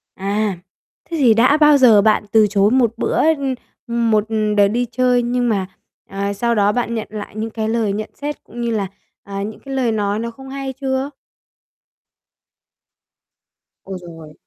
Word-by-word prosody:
À, 200 Hz, +1 st, -1 dB, 0.5 s
thế 330 Hz, -, -3 dB
thì 250 Hz, -6 st, +5 dB
đã 250 Hz, +7 st, +4 dB
bao 300 Hz, -1 st, +6 dB
giờ 230 Hz, -6 st, +6 dB
bạn 215 Hz, 0 st, +3 dB
từ 220 Hz, -1 st, +5 dB
chối 205 Hz, +1 st, +2 dB
một 240 Hz, -3 st, +3 dB
bữa -, -, -1 dB, 0.2 s
ưm, 270 Hz, -2 st, -2 dB, 0.3 s
ừm, 235 Hz, -1 st, 0 dB
một 215 Hz, -1 st, +3 dB, 0.3 s
đợt 200 Hz, -1 st, +6 dB
đi 240 Hz, +4 st, 0 dB
chơi 250 Hz, -1 st, +2 dB
nhưng 245 Hz, 0 st, 0 dB
mà, 195 Hz, -4 st, 0 dB, 0.4 s
à, 200 Hz, +1 st, -2 dB
sau 235 Hz, +4 st, 0 dB
đó 205 Hz, -1 st, +3 dB
bạn 235 Hz, 0 st, -2 dB
nhận 220 Hz, -, -4 dB
lại 210 Hz, -1 st, -7 dB
những 220 Hz, +1 st, -3 dB
cái 220 Hz, 0 st, -3 dB
lời 225 Hz, -3 st, 0 dB
nhận 215 Hz, +1 st, -4 dB
xét 295 Hz, +1 st, -5 dB
cũng 240 Hz, -, -9 dB
như 235 Hz, -, -1 dB
là, 205 Hz, -3 st, -1 dB, 0.4 s
à, 195 Hz, 0 st, -6 dB
những 215 Hz, +1 st, -6 dB
cái 275 Hz, -1 st, -8 dB
lời 250 Hz, -4 st, +1 dB
nói 205 Hz, -1 st, -1 dB
nó 235 Hz, +1 st, -4 dB
không 265 Hz, +3 st, -12 dB
hay 270 Hz, -1 st, -5 dB
chưa? 265 Hz, +1 st, -1 dB, 2.7 s
Ôi 190 Hz, -1 st, -6 dB
giời! 165 Hz, -3 st, -12 dB
225 Hz, 185 wpm, -19 LUFS, 205-250 Hz, 2.7 s, bao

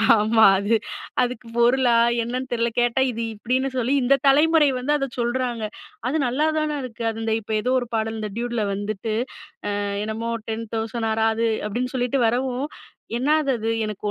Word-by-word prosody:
ஆமா, 220 Hz, +1 st, +3 dB, 0.2 s
அது 205 Hz, +3 st, +2 dB, 0.5 s
அதுக்கு 245 Hz, -1 st, -2 dB
பொருளா 240 Hz, 0 st, +4 dB, 0.3 s
என்னன்னு 255 Hz, +2 st, -4 dB
தெரியல. 235 Hz, -1 st, +1 dB
கேட்டா 240 Hz, +2 st, +2 dB
இது 230 Hz, -, -5 dB
இப்படின்னு 255 Hz, +5 st, 0 dB
சொல்லி 250 Hz, +2 st, +1 dB
இந்த 265 Hz, +3 st, +5 dB
தலைமுறை 300 Hz, +2 st, +5 dB
வந்து 255 Hz, +4 st, -1 dB
அதை 275 Hz, -1 st, -2 dB
சொல்றாங்க. 240 Hz, -1 st, -1 dB, 0.4 s
அது 280 Hz, +5 st, 0 dB
நல்லாதானே 305 Hz, +3 st, 0 dB
இருக்கு. 235 Hz, -2 st, -7 dB
அது 225 Hz, 0 st, -5 dB
இந்த 225 Hz, 0 st, 0 dB
இப்போ 220 Hz, +1 st, -5 dB
ஏதோ 250 Hz, -, 0 dB
ஒரு 245 Hz, -, -5 dB
பாடல் 220 Hz, 0 st, -1 dB
இந்த 215 Hz, -1 st, -3 dB
டியூட்டில 240 Hz, -2 st, -1 dB
வந்துட்டு 205 Hz, +2 st, -3 dB, 0.9 s
என்னமோ, 220 Hz, +2 st, -3 dB, 0.2 s
டென் 225 Hz, +1 st, -3 dB
தௌசண்ட் 225 Hz, 0 st, -2 dB
ஆராது 225 Hz, +1 st, +1 dB, 0.2 s
அப்படின்னு 250 Hz, +5 st, -3 dB
சொல்லிட்டு 250 Hz, +2 st, 0 dB
வரவும். 250 Hz, +3 st, 0 dB, 0.5 s
என்னாது 295 Hz, +3 st, +2 dB
அது 225 Hz, 0 st, -2 dB, 0.2 s
எனக்கு 210 Hz, -2 st, -6 dB
240 Hz, 155 wpm, -23 LUFS, 225-260 Hz, 0.9 s, இந்த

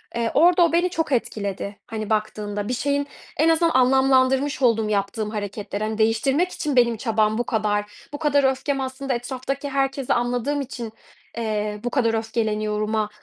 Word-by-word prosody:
Eee, 235 Hz, -1 st, 0 dB
orada 350 Hz, +1 st, +5 dB
o 330 Hz, -, 0 dB
beni 350 Hz, +2 st, +3 dB
çok 325 Hz, -3 st, -2 dB
etkiledi, 200 Hz, -5 st, -2 dB
hani, 215 Hz, -3 st, -5 dB
baktığında. 210 Hz, -1 st, -2 dB
Bir 250 Hz, -, -1 dB
şeyin 285 Hz, +3 st, 0 dB, 0.3 s
en 315 Hz, +3 st, +4 dB
azından 330 Hz, 0 st, +3 dB
anlamlandırmış 265 Hz, +2 st, +3 dB
oldum 225 Hz, -4 st, +3 dB
yaptığım 210 Hz, +1 st, -1 dB
hareketleri. 205 Hz, 0 st, -4 dB
Hani, 215 Hz, 0 st, -2 dB
değiştirmek 265 Hz, +10 st, +2 dB
için 295 Hz, -3 st, -2 dB
benim 235 Hz, -2 st, +4 dB
çabam 215 Hz, -1 st, +1 dB
bu 240 Hz, -, +1 dB
kadar. 210 Hz, -2 st, -2 dB
"Bu -, -, -3 dB
kadar 290 Hz, -2 st, +2 dB
öfkem 270 Hz, +1 st, -2 dB
aslında 265 Hz, 0 st, -3 dB
etraftaki 260 Hz, +3 st, -4 dB
herkesi 270 Hz, -1 st, 0 dB
anladığım 245 Hz, +4 st, 0 dB
için, 240 Hz, -4 st, -6 dB, 0.4 s
eee, 210 Hz, -2 st, -2 dB
bu 245 Hz, -, -1 dB
kadar 240 Hz, -3 st, +1 dB
öfkeleniyorum"a, 215 Hz, -1 st, -1 dB
240 Hz, 160 wpm, -23 LUFS, 215-275 Hz, 0.4 s, orada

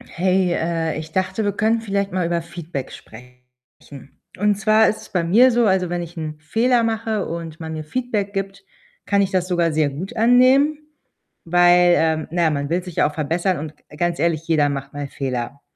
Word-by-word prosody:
Hey, 185 Hz, 0 st, +1 dB
äh, 165 Hz, -2 st, -1 dB
ich 155 Hz, 0 st, -7 dB
dachte, 190 Hz, +4 st, -1 dB
wir 205 Hz, -, +1 dB
können 220 Hz, +3 st, +1 dB
vielleicht 200 Hz, -2 st, -2 dB
mal 185 Hz, -1 st, -1 dB
über 170 Hz, 0 st, -1 dB
Feedback 165 Hz, -4 st, -7 dB
sprechen, 125 Hz, +3 st, -13 dB, 1.0 s
und 210 Hz, +1 st, +2 dB
zwar 215 Hz, +2 st, +3 dB
ist 215 Hz, -, -2 dB
es -, -, -14 dB
bei 180 Hz, -3 st, -1 dB
mir 230 Hz, +10 st, +5 dB
so, 240 Hz, 0 st, +2 dB
also, 190 Hz, -2 st, +1 dB
wenn 175 Hz, 0 st, -2 dB
ich 170 Hz, +1 st, -9 dB
'n 155 Hz, -1 st, -5 dB
Fehler 230 Hz, +9 st, +1 dB
mache 225 Hz, -2 st, -1 dB
und 165 Hz, -1 st, -6 dB
man 160 Hz, -1 st, -6 dB
mir 155 Hz, -1 st, -5 dB
Feedback 210 Hz, +2 st, -3 dB
gibt, 195 Hz, 0 st, -4 dB, 0.4 s
kann 200 Hz, 0 st, +2 dB
ich 195 Hz, -1 st, 0 dB
das 185 Hz, -1 st, 0 dB
sogar 175 Hz, -2 st, +1 dB
sehr 155 Hz, -1 st, +1 dB
gut 180 Hz, +11 st, -7 dB
annehmen, 255 Hz, +6 st, +4 dB, 0.7 s
weil, 175 Hz, +1 st, +5 dB
ähm, 160 Hz, -1 st, 0 dB
na 175 Hz, 0 st, 0 dB
ja, 160 Hz, -, +4 dB
man 145 Hz, -1 st, -2 dB
will 175 Hz, +2 st, -1 dB
sich 180 Hz, -3 st, -9 dB
ja 145 Hz, -, +2 dB
auch -, -, -12 dB
verbessern 170 Hz, +3 st, -1 dB
und 155 Hz, 0 st, -7 dB
g -, -, -32 dB
ganz 175 Hz, -1 st, -1 dB
ehrlich, 165 Hz, 0 st, 0 dB
jeder 155 Hz, -3 st, +2 dB
macht 140 Hz, 0 st, -5 dB
mal 145 Hz, -1 st, -5 dB
Fehler. 135 Hz, 0 st, -4 dB
175 Hz, 205 wpm, -21 LUFS, 160-200 Hz, 1.0 s, mir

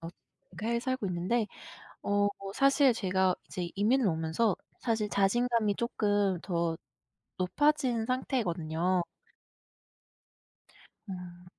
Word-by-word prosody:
엇 165 Hz, +1 st, -7 dB, 0.5 s
해외에 235 Hz, +2 st, +1 dB
살고 255 Hz, -2 st, -2 dB
있는데 185 Hz, +6 st, 0 dB, 0.6 s
어 205 Hz, 0 st, +2 dB, 0.3 s
사실 275 Hz, 0 st, +4 dB
제가 190 Hz, -3 st, +1 dB
이제 175 Hz, -2 st, -4 dB
이민을 225 Hz, +5 st, +3 dB
오면서 165 Hz, +5 st, +1 dB, 0.2 s
사실 220 Hz, -3 st, 0 dB
자신감이 215 Hz, +1 st, +2 dB
쪼끔 205 Hz, -5 st, +1 dB
더 170 Hz, -3 st, -1 dB, 0.6 s
높아진 250 Hz, +4 st, +1 dB
상태거든요. 180 Hz, -, 0 dB, 2.1 s
어. 180 Hz, -2 st, -8 dB
205 Hz, 205 characters per minute, -30 LUFS, 180-235 Hz, 2.1 s, 사실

